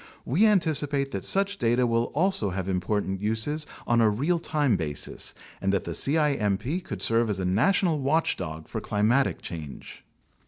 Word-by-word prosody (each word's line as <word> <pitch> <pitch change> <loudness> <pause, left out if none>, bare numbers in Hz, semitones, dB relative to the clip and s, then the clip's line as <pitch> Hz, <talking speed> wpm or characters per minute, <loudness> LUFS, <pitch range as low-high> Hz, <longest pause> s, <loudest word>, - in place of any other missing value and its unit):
We 185 - +3
anticipate 145 -8 +1
that - - -4
such 200 +1 +1
data 120 +2 +2
will 115 0 +1
also 175 - +3
have 95 0 -4
important 95 +1 -1
uses 110 +9 -1 0.2
on 120 0 +3
a 110 - +5
real 145 +12 0
time 150 -7 +1
basis 75 -6 -3 0.3
and 95 - +1
that 100 - 0
the - - -5
cimp 140 -10 +1 0.2
could 100 -2 -4
serve 115 0 +2
as 105 - -1
a 95 - -2
national 155 - +2
watchdog 95 - -1
for - - -5
climatic 110 +6 +1
change. 75 -5 -8
115 Hz, 160 wpm, -26 LUFS, 100-150 Hz, 0.3 s, a